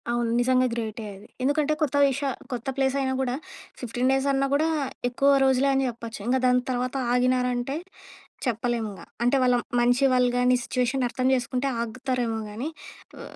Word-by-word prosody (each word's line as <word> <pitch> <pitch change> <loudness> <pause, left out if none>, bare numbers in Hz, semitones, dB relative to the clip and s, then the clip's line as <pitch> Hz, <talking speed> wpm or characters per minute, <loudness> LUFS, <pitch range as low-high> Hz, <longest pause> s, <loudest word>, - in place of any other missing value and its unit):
అవును. 240 -1 0
నిజంగా 255 +1 +3
గ్రేటే 225 -1 -4
అది! 195 - -14 0.2
ఎందుకంటే 290 +2 +2
కొత్త 285 -3 0
విష 275 0 0 0.3
కొత్త 245 -1 -5
ప్లేస్ 270 0 +1
అయినా 265 -1 0
గూడా 250 -1 -1 0.4
15 245 +1 -1
డేస్ 270 +1 +1
అన్నా 275 0 +1
కూడా 305 +3 +3 0.4
ఎక్కువ 275 +3 +2 0.2
రోజులే 265 +1 +3
అని 270 0 +2
చెప్పొచ్చు. 230 -1 -8
ఇంక 255 +2 +3
దాని 250 0 +4
తర్వాత 250 +1 -2 0.2
ఆగినారంటే 250 +1 +1 0.7
చెప్పలేమింగా. 230 -3 -2 0.2
అంటే 245 +3 +3
వాళ్ళ 250 -1 +4 0.2
మంచి 245 +2 +3
వాళ్ళు 250 -1 +3
గాని 250 0 +4
సిట్యుయేషన్ 250 +1 0
అర్థం 255 +1 -1
చేసుకుంటే 250 +2 -1
ఆగుతారేమో 235 0 -2
గానీ 240 +9 -4 0.5
ఉ - - -8
250 Hz, 155 wpm, -25 LUFS, 240-265 Hz, 0.7 s, దాని